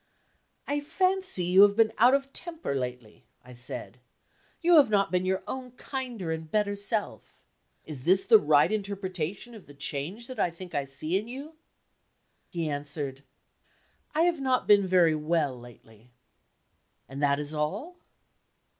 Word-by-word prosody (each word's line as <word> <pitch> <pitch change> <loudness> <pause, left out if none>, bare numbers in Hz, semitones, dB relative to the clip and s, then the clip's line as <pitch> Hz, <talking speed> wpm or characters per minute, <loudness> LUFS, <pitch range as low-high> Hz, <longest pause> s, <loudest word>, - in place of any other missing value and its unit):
"I 290 +1 0
fancy 370 - +1
you 185 +2 +5
have 200 0 +6
been 225 0 +3
out 245 +4 +6
of 275 0 -3
temper 335 - -4
lately," 125 -4 -5 0.2
I 125 - -12
said. 120 0 -6 0.6
"You 345 -1 +5
have 280 -6 +6
not 200 -2 +2
been 185 0 0
your 190 0 0
own 255 -2 -6
kinder 250 - -5
and 160 -1 -5
better 205 +2 0
self. 205 +1 -4 0.4
Is 145 -5 -8
this 190 +4 +3
the 225 -2 +7
right 150 +2 +4
interpretation 200 0 -4
of 215 -4 -13
the 145 - -14
change 150 +10 -4
that 255 -2 -9
I 180 - +2
think 175 +1 -11
I 140 - -1
see 155 +7 -2
in 215 - -8
you?" 275 +6 -8 1.0
He 170 -2 -3
answered: 145 -2 -4 0.9
"I 320 - +3
have 340 -4 +1
not 260 -1 +1
been 200 -2 +5
very 175 -3 +4
well 155 -3 0
lately." 120 -1 -16 1.0
"And 135 +2 -7
that 140 0 +2
is 150 +1 -4
all?" 155 - -3
185 Hz, 155 wpm, -28 LUFS, 150-240 Hz, 1.0 s, the